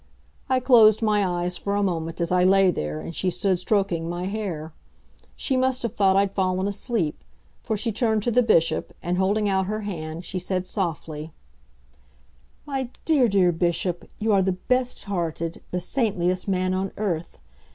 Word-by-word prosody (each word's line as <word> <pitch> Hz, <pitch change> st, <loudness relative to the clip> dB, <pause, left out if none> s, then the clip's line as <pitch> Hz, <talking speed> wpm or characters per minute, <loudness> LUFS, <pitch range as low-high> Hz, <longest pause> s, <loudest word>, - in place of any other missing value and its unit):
I 260 Hz, -1 st, +3 dB
closed 230 Hz, -4 st, +6 dB
my 210 Hz, -2 st, +3 dB
eyes 175 Hz, -1 st, -1 dB
for 200 Hz, 0 st, -2 dB
a 205 Hz, -, +1 dB
moment 165 Hz, -3 st, -2 dB
as 170 Hz, 0 st, -1 dB
I 180 Hz, 0 st, +3 dB
lay 190 Hz, 0 st, +5 dB
there 75 Hz, -, -3 dB
and 165 Hz, -, -7 dB
she 185 Hz, -, 0 dB
stood 180 Hz, 0 st, 0 dB
stroking 180 Hz, -4 st, 0 dB
my 175 Hz, +1 st, -3 dB
hair. 185 Hz, -7 st, -4 dB, 0.6 s
She 270 Hz, -, -1 dB
must 260 Hz, 0 st, +1 dB
have 235 Hz, -2 st, -2 dB
thought 195 Hz, -2 st, +3 dB
I'd 195 Hz, 0 st, +2 dB
fallen 185 Hz, 0 st, 0 dB
asleep, 200 Hz, -, -2 dB, 0.4 s
for 220 Hz, -3 st, -2 dB
she 230 Hz, +3 st, -1 dB
turned 220 Hz, -1 st, +1 dB
to 240 Hz, -, 0 dB
the 250 Hz, +2 st, +4 dB
Bishop, 170 Hz, -9 st, +2 dB
and 180 Hz, +1 st, -1 dB
holding 205 Hz, +2 st, +2 dB
out 190 Hz, -1 st, +1 dB
her 215 Hz, +1 st, -2 dB
hand, 165 Hz, -4 st, -5 dB
she 185 Hz, -, -3 dB
said 185 Hz, +1 st, -2 dB
softly: 160 Hz, -5 st, -4 dB, 1.3 s
"My 270 Hz, -4 st, -3 dB, 0.2 s
dear, 290 Hz, -6 st, +4 dB
dear 190 Hz, -4 st, +3 dB
Bishop, 175 Hz, +1 st, -1 dB
you 220 Hz, 0 st, +1 dB
are 195 Hz, -, +4 dB
the 190 Hz, 0 st, +1 dB
best 250 Hz, +6 st, -1 dB
hearted, 170 Hz, -4 st, -3 dB
the 180 Hz, -, -2 dB
saintliest 185 Hz, -4 st, 0 dB
man 185 Hz, -1 st, 0 dB
on 190 Hz, +1 st, -1 dB
earth. 175 Hz, -6 st, -3 dB
190 Hz, 175 wpm, -24 LUFS, 175-215 Hz, 1.3 s, closed